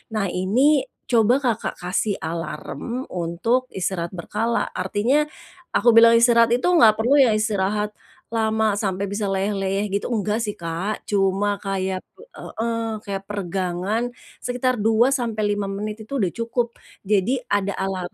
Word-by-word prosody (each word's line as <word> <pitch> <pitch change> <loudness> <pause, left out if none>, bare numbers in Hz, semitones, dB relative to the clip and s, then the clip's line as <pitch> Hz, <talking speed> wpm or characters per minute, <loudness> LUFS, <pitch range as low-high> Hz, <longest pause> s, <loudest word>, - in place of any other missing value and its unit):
nah, 210 - +1
ini 255 +11 +2 0.2
coba 235 0 +4
Kakak 230 -3 -1
kasih 190 +3 0
alarm 170 +9 -4
untuk 185 +9 0
istirahat 180 -2 -2
berkala 215 +7 -1
artinya, 265 +9 +1 0.5
aku 240 - +4
bilang 230 0 +8
istirahat 235 0 +5
itu 250 - 0
enggak 230 -12 +6
perlu 265 +6 +4
yang 235 -6 +5
istirahat, 210 -1 0 0.4
lama 220 -2 +1
sampai 195 -1 -1
bisa 205 +1 -2
leyeh-leyeh 195 +1 -1
gitu 200 - -1
enggak 215 0 0
sih 210 -2 -2
Kak. 170 +5 -4
Cuma 200 0 +1
kayak 190 -1 -2 0.4
heeh, 225 -1 -3
kayak 195 -1 -4
peregangan 190 +2 -2 0.3
sekitar, 250 0 -1
2 225 +3 +3
sampai 235 -6 -1
5 205 - -2
menit 210 +2 -5
itu 275 +1 -2
udah 185 - +2
cukup. 235 +1 -1 0.3
Jadi 210 +6 +1
ada 200 -1 +1
alarm 190 -2 -3
210 Hz, 140 wpm, -22 LUFS, 195-230 Hz, 0.5 s, bilang